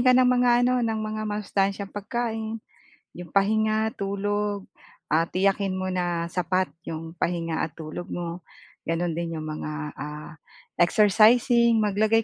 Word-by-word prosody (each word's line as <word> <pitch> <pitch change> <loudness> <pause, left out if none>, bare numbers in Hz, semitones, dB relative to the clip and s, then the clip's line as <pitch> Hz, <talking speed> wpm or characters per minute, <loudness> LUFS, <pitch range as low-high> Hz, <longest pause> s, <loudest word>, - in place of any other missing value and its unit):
ka 255 0 +5
ng 255 - +6
mga 250 0 +4
ano, 250 0 +2
ng 225 -2 0
mga 215 0 -3
masustansyang 200 -1 -1
pagkain, 225 +1 -3 0.6
'yong 175 +1 -11
pahinga, 215 +2 +2
tulog, 205 0 -1 0.5
ah, 165 +2 +3
tiyakin 195 +1 +1
mo 185 0 -2
na 175 -2 -1
sapat 185 +1 0 0.2
'yong 160 0 -5
pahinga 165 -2 -1
at - - -21
tulog 160 +3 -7
mo, 175 0 -4 0.5
gano'n 165 +1 0
din 165 0 -3
'yong 155 - -4
mga, 155 0 -5 0.3
ah, 150 +2 -7 0.5
exercising 225 +4 +5
maglagay 215 +2 +2
200 Hz, 135 wpm, -25 LUFS, 170-220 Hz, 0.6 s, ng